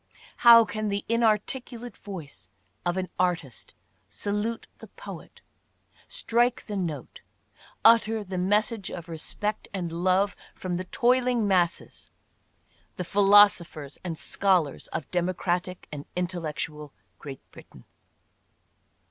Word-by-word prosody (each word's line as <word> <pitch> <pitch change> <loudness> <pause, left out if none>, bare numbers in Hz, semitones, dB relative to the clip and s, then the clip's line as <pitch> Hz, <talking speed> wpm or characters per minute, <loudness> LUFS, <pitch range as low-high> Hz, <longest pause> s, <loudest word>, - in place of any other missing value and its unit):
How 230 -1 +8
can 215 -1 -3
the 200 0 -2
inarticulate 230 +1 0
voice 145 - -9 0.4
of 175 +1 0
an 185 -2 -2
artist 170 -9 -2 0.3
salute 210 +3 -2
the - - -11
poet - - -11 0.4
— - - -44 0.2
strike 245 - +1
the 210 - -5
note 165 -8 -4 0.3
— - - -26
utter 225 -1 +5
the 185 -2 -4
message 205 +2 +1
of 170 -2 -7
respect 190 +6 -4
and 175 -3 -3
love 185 +3 +1 0.2
from 185 -1 -4
the 185 - -4
toiling 245 +1 +2
masses, 180 -3 0 0.9
the 180 - -2
philosophers 195 -7 +4
and 170 -3 -4
scholars, 180 -5 +1
of 145 - -6
democratic 180 0 -1
and 145 -1 -7
intellectual 160 -4 -3 0.3
Great 140 -3 -9
Britain - - -15
185 Hz, 115 wpm, -27 LUFS, 170-215 Hz, 0.9 s, How